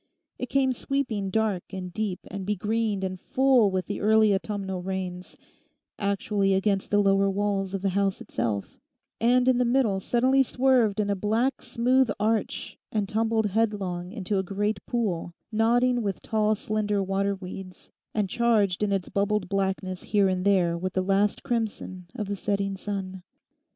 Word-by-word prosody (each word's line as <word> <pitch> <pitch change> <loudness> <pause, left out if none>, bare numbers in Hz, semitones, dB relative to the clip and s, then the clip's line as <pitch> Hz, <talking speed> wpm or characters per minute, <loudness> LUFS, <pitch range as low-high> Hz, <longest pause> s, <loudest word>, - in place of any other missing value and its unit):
It 250 - -3
came 265 -1 +2
sweeping 245 -7 -2
dark 210 -2 0
and 185 -2 -6
deep 210 -3 -2
and 195 0 -5
begreened 210 +1 -1
and 185 -1 -3
full 260 -3 +3
with 185 -1 -1
the 205 - -4
early 215 0 +5
autumnal 195 -2 -3
rains, 185 -1 -5 0.6
actually 200 -1 +1
against 195 0 0
the 205 - +2
lower 195 -1 +3
walls 195 -1 -1
of 195 - -4
the 195 - +2
house 195 0 0
itself, 110 -4 -3 0.4
and 250 +2 +3
in 255 -1 +4
the - - +4
middle 240 -5 +2
suddenly 255 +6 +3
swerved 250 -5 +2
in 205 -1 +1
a - - +1
black, 225 +7 0
smooth 255 +1 +2
arch, 220 +1 -1
and 210 -2 0
tumbled 225 +1 +1
headlong 195 -4 -1
into 200 -2 -2
a - - 0
great 200 +1 -2
pool, 185 -8 -2 0.2
nodding 240 +3 +3
with 200 -3 -3
tall 215 -1 +1
slender 210 -1 -1
water 195 +1 0
weeds, 185 -1 -9 0.2
and 210 -2 +1
charged 210 -4 +2
in 210 -1 +1
its 195 -2 -1
bubbled 200 -2 0
blackness 190 -1 -1
here 205 -2 +2
and 185 0 -1
there 180 -4 +3
with 185 +2 -3
the 185 - 0
last 200 +2 +1
crimson 220 -7 -3
of 210 - -3
the 200 - -2
setting 200 0 -1
sun. 190 -2 -5
200 Hz, 165 wpm, -26 LUFS, 190-220 Hz, 0.6 s, early